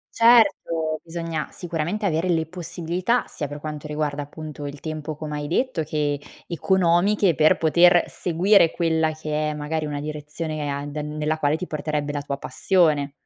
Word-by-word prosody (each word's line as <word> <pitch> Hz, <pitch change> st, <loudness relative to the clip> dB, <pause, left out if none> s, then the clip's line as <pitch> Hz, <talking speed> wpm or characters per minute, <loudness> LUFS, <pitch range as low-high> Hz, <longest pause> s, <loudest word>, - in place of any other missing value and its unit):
Certo! 195 Hz, -9 st, +4 dB
Bisogna 165 Hz, -2 st, -4 dB
sicuramente 175 Hz, +4 st, -3 dB
avere 170 Hz, 0 st, +1 dB
le 165 Hz, -2 st, +2 dB
possibilità, 175 Hz, +6 st, -2 dB
sia 145 Hz, -3 st, -4 dB
per 145 Hz, 0 st, -7 dB
quanto 150 Hz, -1 st, -6 dB
riguarda 150 Hz, -1 st, -2 dB
appunto 145 Hz, 0 st, -7 dB
il 140 Hz, 0 st, -7 dB
tempo 155 Hz, -1 st, -5 dB
come 150 Hz, -1 st, -5 dB
hai 145 Hz, 0 st, -4 dB
detto 180 Hz, -3 st, 0 dB
che, 145 Hz, -1 st, -1 dB, 0.3 s
economiche 180 Hz, +2 st, +2 dB
per 155 Hz, +1 st, +4 dB
poter 175 Hz, +2 st, +5 dB
seguire 180 Hz, +1 st, +3 dB
quella 160 Hz, -2 st, +1 dB
che 155 Hz, -1 st, -2 dB
è -, -, -5 dB
magari 155 Hz, +1 st, -3 dB
una 145 Hz, -1 st, -4 dB
direzione 155 Hz, +1 st, -5 dB
e -, -, -2 dB
a 140 Hz, 0 st, -3 dB
den 150 Hz, +1 st, -5 dB
nella 155 Hz, +1 st, -1 dB
quale 150 Hz, +1 st, +2 dB
ti 180 Hz, -, -5 dB
porterebbe 150 Hz, -1 st, -2 dB
la 145 Hz, -, -2 dB
tua 140 Hz, -1 st, -4 dB
passione. 145 Hz, 0 st, +1 dB
155 Hz, 165 wpm, -23 LUFS, 150-170 Hz, 0.3 s, poter